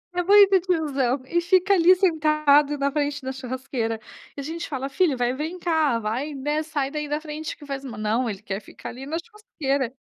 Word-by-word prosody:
É 355 - +2
muito 395 0 +6
tiozão. 285 -7 0
E 345 +6 0
fica 370 +3 +3
ali 365 0 +6
sentado 305 -4 +3
na 280 0 0
frente 290 -1 -2
da 265 - -3
churrasqueira. 255 -3 -4 0.4
E - - -3
a - - -7
gente 330 +3 -5
fala: 270 -1 -3
"Filho, 285 -2 +1
vai, 245 0 +1
vem 315 +7 -4
cá, 320 -8 +1
vai, 245 +7 -3
né, 295 +3 -1
sai 295 -3 -2
daí 300 0 -3
da 295 - -1
frente 310 0 -6
que 290 - -13
faz 275 -1 -5
ma". 245 -6 -7
Não, 225 +3 0
ele 200 - -5
quer 195 0 -4
ficar - - -10
ali 265 +3 -9
na 320 +2 -2
churrasqueira. 285 - -3
290 Hz, 210 wpm, -24 LUFS, 260-325 Hz, 0.4 s, muito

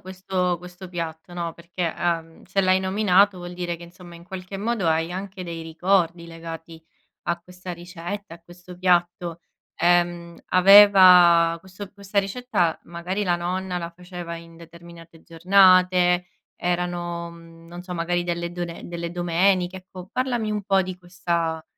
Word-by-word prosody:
questo 185 -1 -2
questo 180 +1 -11
piatto, 165 -1 -6
no, 170 -1 -3
perché, 170 0 -4
uhm, 165 -2 -2
se 195 - 0
l'hai 185 0 +3
nominato 195 0 +3
vuol 175 0 -8
dire 175 -1 -3
che 170 - -11
insomma 175 0 -13
in 170 - -15
qualche 190 0 -7
modo 210 -4 -1
hai 165 +2 0
anche 190 -1 -6
dei 165 -1 -6
ricordi 170 +1 0
legati 165 0 -9 0.4
a 170 0 0
questa 180 +1 -9
ricetta, 175 +2 -7
a 170 - -16
questo 175 +1 -14
piatto, 175 -1 +1 0.4
ehm, 175 -1 +1
aveva 185 -3 +7
questo 190 +2 -10
questa 200 0 -3
ricetta, 195 -4 0
magari 175 +4 -4
la 175 -3 +1
nonna 180 +1 -3
la 170 -1 -5
faceva 175 -1 -8
in 165 0 -12
determinate 170 0 -14
giornate, 180 0 +4 0.3
erano, 175 -1 -2
mhmm, 165 0 -15
non 175 +1 -9
so, 180 -1 -7
magari 175 +1 -1
delle 170 0 -3
done 175 -1 -6
delle 170 0 -5
domeniche, 180 +1 +1
ecco, 185 0 -11
parlami 245 -4 -1
un 210 -1 -2
po' 195 -1 +3
di 185 0 -6
questa 170 -3 -2
175 Hz, 150 wpm, -23 LUFS, 170-185 Hz, 0.4 s, aveva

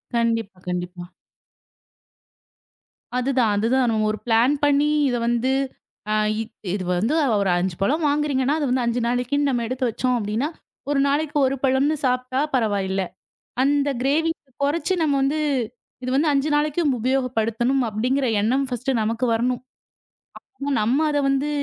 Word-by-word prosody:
கண்டிப்பா. 230 -4 0
கண்டிப்பா 180 0 -4 2.1
அது 250 +2 0
தான் 225 -4 +3
அது 210 +2 +1
தான் 255 -3 +2 0.2
ஒரு 215 - -2
ப்ளான் 235 +4 +4
பண்ணி 290 +1 +3 0.2
இத 245 - 0
வந்து 240 +2 +1 0.6
அ - - +2 0.6
இது 200 - -2
வந்து 220 +11 0 0.3
ஒரு 195 - +1
5 180 0 -1
பழம் 300 +11 +1
வாங்குறீங்க. 290 -2 +1 0.2
அது 295 - 0
வந்து 250 0 +1
5 235 +1 0
நாளைக்கு 245 +3 0
நாம 245 -3 0
எடுத்து 255 +1 -1
வச்சோம். 250 +3 0
அப்படின்னா 215 +6 -1 0.4
1 285 -1 +2
நாளைக்கு 295 +1 0
1 270 - -1
பழம்னு 270 +3 +2
சாப்பிட்டா 255 +1 0
பரவாயில்ல. 200 -6 0 0.6
அந்த 285 +1 +2
க்ரேவிங்க்ஸ் 295 +1 0
குறைச்சு 330 +6 0
நம்ம 305 -3 +2
வந்து 280 +3 +1 0.6
இது 255 - -2
வந்து 300 +3 +3
5 280 +2 +1
நாளைக்கு 300 +3 +1 0.2
உபயோகப்படுத்தனும் 250 0 0
அப்படிங்கற 250 +6 0
எண்ணம் 260 +6 +1
ஃபர்ஸ்ட்டு 250 0 -1
நமக்கு 225 +3 -1
வரணும். 245 +2 0 1.2
நம்ம 240 +7 +2
அத 290 - +1
வந்து 275 +2 +1
255 Hz, 140 wpm, -23 LUFS, 225-280 Hz, 2.1 s, ப்ளான்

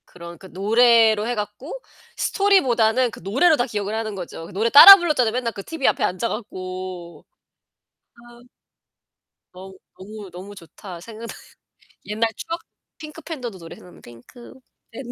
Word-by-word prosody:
그런 170 -1 -12
그 190 - -14
노래로 220 +2 +2
해 245 - -2
갖고 210 +7 -7 0.4
스토리보다는 255 - +1
그 - - -12
노래로 270 - +2
다 245 - 0
기억을 205 -2 -5
하는 220 -2 -4
거죠. 175 -3 -9
그 - - -14
노래 220 +5 -1
따라 345 +10 +11
불렀잖아, 300 - 0
맨날 235 -1 -3
그 200 - -9
티비 320 0 -3
앞에 - - 0
앉아 185 +6 -2
갖고. 185 -4 -8 0.9
아. 240 0 -19 1.0
너- 190 +1 -12 0.2
너무 205 +1 -11
너무 195 +3 -11
좋다 175 0 -12
생각나. 225 +3 -10 0.7
옛날 220 +2 -1
추억. 335 +1 -6 0.4
핑크 310 +1 -11
팬더도 250 - -8
노래 165 -2 -12
생각나. 180 - -17
핑크 120 - -16 0.4
팬더 245 +1 -9
220 Hz, 300 characters per minute, -21 LUFS, 190-245 Hz, 1.0 s, 따라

